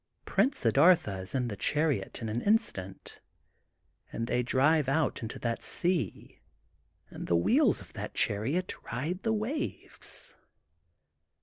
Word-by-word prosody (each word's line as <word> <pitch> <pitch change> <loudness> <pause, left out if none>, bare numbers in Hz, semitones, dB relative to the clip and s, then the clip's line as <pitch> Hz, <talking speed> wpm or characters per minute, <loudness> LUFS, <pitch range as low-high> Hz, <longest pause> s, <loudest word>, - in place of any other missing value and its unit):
Prince 235 +8 +2
Siddartha 135 - +4
is 95 +7 -5
in 125 -2 0
the 105 - -4
chariot 150 +1 -1
in - - -2
an 115 +3 -2
instant 150 - -1 0.9
and 115 - -3
they 120 +1 +1
drive 140 +4 +3
out 150 0 +1
into 110 -1 -5
that 115 -1 -2
sea 170 - -1 0.7
and - - -7
the 85 - +2
wheels 85 - +3
of - - -15
that - - -6
chariot 135 - 0 0.2
ride 155 - -3
the 225 - 0
waves. 225 +8 -4
135 Hz, 130 wpm, -30 LUFS, 115-180 Hz, 0.9 s, Siddartha